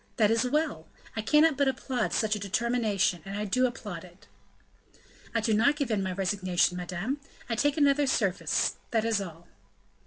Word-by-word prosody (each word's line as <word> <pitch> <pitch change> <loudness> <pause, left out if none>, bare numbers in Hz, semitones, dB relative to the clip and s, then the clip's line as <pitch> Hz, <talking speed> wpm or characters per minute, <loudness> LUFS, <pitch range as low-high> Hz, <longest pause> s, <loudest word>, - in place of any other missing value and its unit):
That 215 -1 +4
is 230 +2 +2
well! 295 - -1 0.3
I 220 - -1
cannot 300 +5 +4
but 280 -1 +2
applaud 260 -3 -1
such 215 -1 +1
a - - -4
determination, 205 -3 0
and 195 +1 -6
I 210 - -2
do 255 +6 +2
applaud 205 -8 -7
it." 180 +1 -16 1.1
"I 230 - +2
do 220 0 +1
not 235 +7 +4
give 280 -5 -2
in 210 -2 +1
my 190 -1 -2
resignation, 185 -1 +1
madame; 180 +10 -3 0.3
I 240 - -2
take 290 +6 +1
another 285 -1 +3
service, 200 -8 +1
that 225 -1 +1
is 225 -3 +1
all." 170 -3 -9
220 Hz, 180 wpm, -28 LUFS, 190-255 Hz, 1.1 s, That